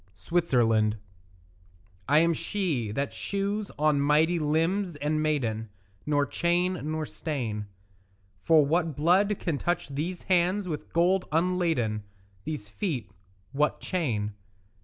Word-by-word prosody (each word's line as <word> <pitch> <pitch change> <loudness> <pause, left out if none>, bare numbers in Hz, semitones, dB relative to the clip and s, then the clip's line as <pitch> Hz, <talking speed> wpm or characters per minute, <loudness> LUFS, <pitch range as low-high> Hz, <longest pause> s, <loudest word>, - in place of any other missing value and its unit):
SWITZERLAND 115 - +2 1.1
I 145 - +5
am 170 +1 +4
she 155 - -2
that 140 +6 -2
shews 200 +1 -2
on 150 -1 +3
mighty 155 +4 +3
limbs 165 +4 0
and 150 +1 -1
maiden 115 -8 -1 0.4
Nor 145 -1 +2
chain 175 +3 0
nor 155 0 -2
stain; 115 -11 -4 0.7
For 160 -3 +5
what 160 0 +1
blood 185 +7 +3
can 155 -5 -2
touch 175 -4 -1
these 165 +6 -4
hands 185 +2 +2
with 155 -4 -5
gold 180 +3 +2
unladen, 165 -10 +1 0.4
These 150 -10 -4
feet 120 - -3 0.4
what 150 +2 +1
chain? 115 - -2
155 Hz, 115 wpm, -27 LUFS, 140-175 Hz, 1.1 s, I